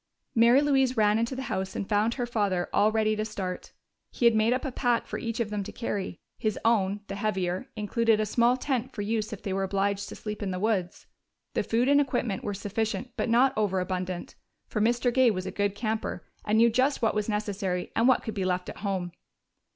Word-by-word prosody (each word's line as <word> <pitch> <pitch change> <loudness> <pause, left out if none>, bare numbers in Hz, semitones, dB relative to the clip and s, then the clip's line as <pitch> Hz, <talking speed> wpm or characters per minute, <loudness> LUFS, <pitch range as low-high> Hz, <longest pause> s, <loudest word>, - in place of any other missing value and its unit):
Mary 235 +4 +6
Louise 270 -3 +2
ran 210 0 +4
into 230 +3 -1
the 265 - -4
house 190 -6 -3
and 195 - -3
found 215 +2 +1
her 245 - -1
father 205 -7 0
all 210 +2 +4
ready 215 0 +2
to 215 - -1
start. 195 -4 -5 0.4
He 240 - -1
had 235 - +7
made 220 +1 +3
up 255 +4 0
a 270 - -2
pack 245 -2 +1
for - - -5
each 230 0 -4
of 220 -3 -1
them 210 -1 -1
to 195 - -7
carry; 200 -6 -4 0.2
his 215 -2 -1
own, 205 -3 +2
the 200 - -6
heavier, 190 -3 -2
included 225 +1 +2
a 215 - +1
small 235 +4 +3
tent 260 -1 -2
for 205 - -3
use 215 +1 -1
if 215 - -7
they 195 - -2
were 195 - 0
obliged 195 +1 -1
to - - -8
sleep 210 -1 -6
in 200 - -2
the 185 -1 -3
woods. 195 -4 -1 0.5
The - - +1
food 235 +3 +1
and 285 +1 +5
equipment 245 -7 -1
were 205 -1 -3
sufficient 220 +5 -3
but - - -1
not 255 +4 +4
overabundant, 185 -3 -2 0.3
for 215 - -2
Mr. 240 +2 +2
Gay 260 -1 +5
was 185 -4 -2
a 190 - -4
good 205 -1 -1
camper 220 +1 -3 0.2
and 215 +1 +1
knew 230 +1 +6
just 255 +2 +1
what 225 - +3
was 210 0 -1
necessary 200 -4 -2
and 230 +2 +3
what 260 - +4
could 220 - -4
be 195 - -2
left 180 0 -1
at - - -8
home. 190 -3 -2
215 Hz, 225 wpm, -28 LUFS, 195-235 Hz, 0.5 s, had